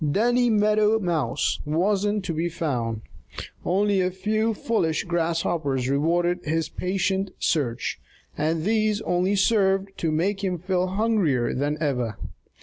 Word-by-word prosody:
Danny 240 +6 +2
Meadow 215 0 +3
Mouse 170 - -1
wasn't 200 +6 0
to 170 - -2
be 165 +2 -1
found. 120 -9 -2 0.6
Only 200 +1 +2
a 180 - +1
few 215 +4 -1
foolish 170 -8 0
grasshoppers 165 -6 -1
rewarded 175 +5 +1
his 160 +1 -1
patient 190 +1 -1
search, 125 -8 -1 0.4
and 155 +1 -1
these 215 +1 +1
only 180 +1 +1
served 195 -1 +2
to 165 - 0
make 195 +6 0
him 185 -2 0
feel 180 +1 -1
hungrier 190 - +1
than 145 +3 -1
ever. 125 -8 -1
180 Hz, 130 wpm, -24 LUFS, 155-205 Hz, 0.6 s, Meadow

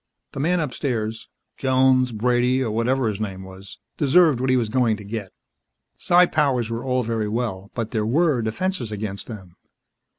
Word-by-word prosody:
The - - -7
man 175 +5 +1
upstairs 120 -6 -3 0.3
Jones, 130 -1 +3
Brady 125 +3 +1
or 115 - -2
whatever 120 +3 +1
his 105 -2 -3
name 95 -3 -5
was 95 0 -12 0.2
deserved 150 -2 +4
what 130 - 0
he 130 - +4
was 120 -3 0
going 115 -2 +1
to 105 - -10
get. 100 -1 -6 0.7
Psi 175 +1 +5
powers 135 -8 0
were 115 +1 -3
all 130 -1 0
very 110 -2 -2
well, 105 -4 -3
but 115 -2 -3
there 110 -2 -1
were 150 0 +2
defenses 120 - -2
against 100 -1 -5
them. 95 -7 -10
120 Hz, 170 wpm, -23 LUFS, 110-130 Hz, 0.7 s, Psi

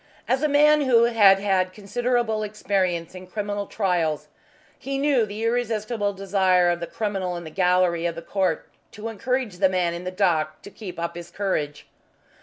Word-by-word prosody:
As 260 +1 +1
a 305 - +3
man 300 +1 +5
who 245 -4 +4
had 215 -5 +6
had 190 -2 0
considerable 220 +2 -1
experience 190 -5 -1
in 185 0 -10
criminal 205 0 -3
trials 165 -7 -1 0.5
he 275 0 -3
knew 275 -5 +2
the 210 +2 -6
irresistible 225 -2 -1
desire 190 -2 +2
of 175 - -2
the 170 - -5
criminal 195 -5 -3
in 170 - -7
the 160 - -9
gallery 180 -1 +2
of 170 - -4
the 165 - -7
court 185 -3 -1 0.3
to 215 +2 -6
encourage 250 -2 -2
the 190 0 +3
man 180 -2 0
in 170 +1 -6
the 180 - -3
dock 170 -5 0
to 200 - -10
keep 185 -6 -8
up 170 0 -3
his 175 0 -8
courage. 150 -7 -2
195 Hz, 180 wpm, -24 LUFS, 180-220 Hz, 0.5 s, had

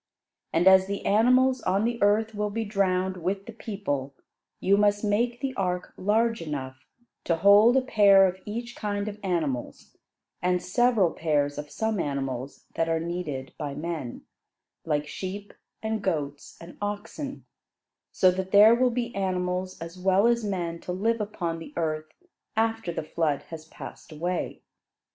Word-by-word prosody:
And 170 +3 +3
as 190 0 +7
the 200 0 -4
animals 255 +4 +4
on 195 +3 +1
the 235 0 -2
earth 215 +2 +3
will 210 0 -1
be 225 +2 -3
drowned 190 -2 0
with 190 +3 -2
the - - -8
people, 145 - -4 0.4
you 195 +2 +3
must 205 0 +2
make 235 +4 0
the 270 -1 -2
ark 180 -5 -2
large 225 +3 +1
enough 130 -4 -6 0.4
to 170 - +2
hold 205 +7 +6
a 265 - +3
pair 200 -5 +6
of 185 0 -4
each 235 +3 -5
kind 205 -1 -3
of 210 0 -6
animals 160 -10 -3 0.5
and 180 0 +2
several 215 -2 +2
pairs 145 -3 0
of 150 0 -7
some 220 +2 -1
animals 135 -3 -3
that 165 0 0
are 165 0 +1
needed 160 -6 -4
by 140 -1 -4
men, 150 -5 -5 0.6
like 150 -2 0
sheep 195 +6 -6 0.3
and 220 -1 -1
goats 145 -7 -3
and 170 +1 -12
oxen; 210 +7 -5 0.7
so 185 - +4
that 190 +1 -3
there 210 +2 +8
will 250 +1 +3
be 240 0 -3
animals 185 -1 -2
as 165 +2 -8
well 190 +3 +3
as 235 -1 +3
men 175 -5 -3
to 180 - -6
live 220 +5 0
upon 175 -6 -3
the 165 - -10
earth 155 -1 -2 0.5
after 225 -4 0
the 165 - -4
flood 155 -2 -1
has 160 -1 -7
passed 160 - -11
away. 175 +3 -3
190 Hz, 160 wpm, -27 LUFS, 165-215 Hz, 0.7 s, there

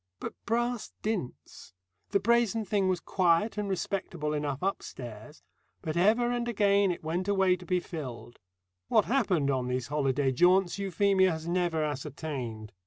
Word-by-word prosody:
But - - -5
brass 240 0 -1
dints. 180 - -5 0.3
The 200 - +2
brazen 230 0 +2
thing 200 -1 +1
was 185 -2 +1
quiet 180 +4 +2
and 210 -1 -2
respectable 175 -5 -2
enough 145 -2 -2
upstairs, 125 - -5 0.4
but 155 0 -3
ever 225 +7 +3
and 240 -1 -1
again 200 -3 +3
it 175 - -6
went 175 +4 -2
away 190 -2 +3
to 180 -1 -13
be 180 -1 +2
filled. 130 -9 -8 0.5
What - - +3
happened 190 - +1
on 130 -2 -1
these 125 +1 -2
holiday 140 -2 +1
jaunts 180 +7 +3
Euphemia 195 -1 +3
has 160 -1 -4
never 170 -2 0
ascertained. 140 -7 -5
180 Hz, 150 wpm, -29 LUFS, 145-200 Hz, 0.5 s, ever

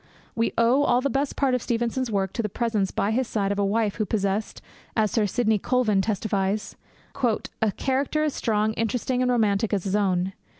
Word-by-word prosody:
We 230 0 0
owe 235 +4 +4
all 245 -4 +3
the 275 +1 -1
best 275 +3 -1
part 270 -2 +1
of 250 - +1
Stevenson's 240 +2 -1
work 195 -3 -1
to - - -1
the 210 - -2
presence 215 -3 0
by 205 - -1
his 250 +2 0
side 200 -4 -1
of 200 - -1
a - - +2
wife 210 +1 0
who 215 - 0
possessed, 200 0 -1 0.4
as 215 -2 +2
Sir 215 -3 +2
Sidney 220 +1 +1
Colvin 225 -4 +2
testifies, 205 -1 -1 0.5
'a 220 -2 0
character 275 +3 0
as 305 -2 0
strong, 215 -1 0
interesting, 245 +3 -1
and 250 - +2
romantic 220 -3 +1
as 195 - -2
his 195 0 -1
own. 190 -2 +1
220 Hz, 200 wpm, -25 LUFS, 200-245 Hz, 0.5 s, owe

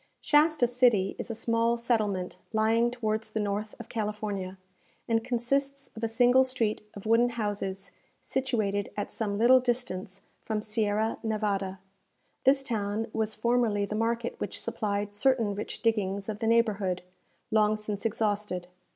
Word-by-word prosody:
Shasta 300 -2 +4
City 240 -6 +3
is - - -5
a 230 - -3
small 230 +1 +1
settlement 215 -6 -1
lying 225 +2 +3
towards 220 -2 -2
the 220 - -3
north 210 +1 -2
of 235 - -8
California, 210 -3 -3 0.5
and 225 -1 +1
consists 275 +3 -1
of 220 - -8
a - - +3
single 245 +3 +5
street 240 -5 0
of 200 - -9
wooden 230 +2 +4
houses 205 -4 -3 0.3
situated 215 -7 -1
at 205 - -3
some 205 -3 -2
little 245 +4 +7
distance 220 -7 -3 0.2
from 220 -1 -2
Sierra 215 0 0
Névada. 205 -3 -1 0.7
This 270 +1 +5
town 220 -2 -2
was 220 -1 -1
formerly 225 -2 +2
the 205 - -5
market 230 +2 0
which - - -3
supplied 205 -1 -2
certain 230 -1 +2
rich 205 +5 -6
diggings 200 -3 0
of 210 -1 -4
the 225 - -1
neighbourhood, 210 -6 +2 0.5
long 215 0 +3
since 210 -1 -5
exhausted. 205 -4 -1
220 Hz, 145 wpm, -29 LUFS, 205-235 Hz, 0.7 s, little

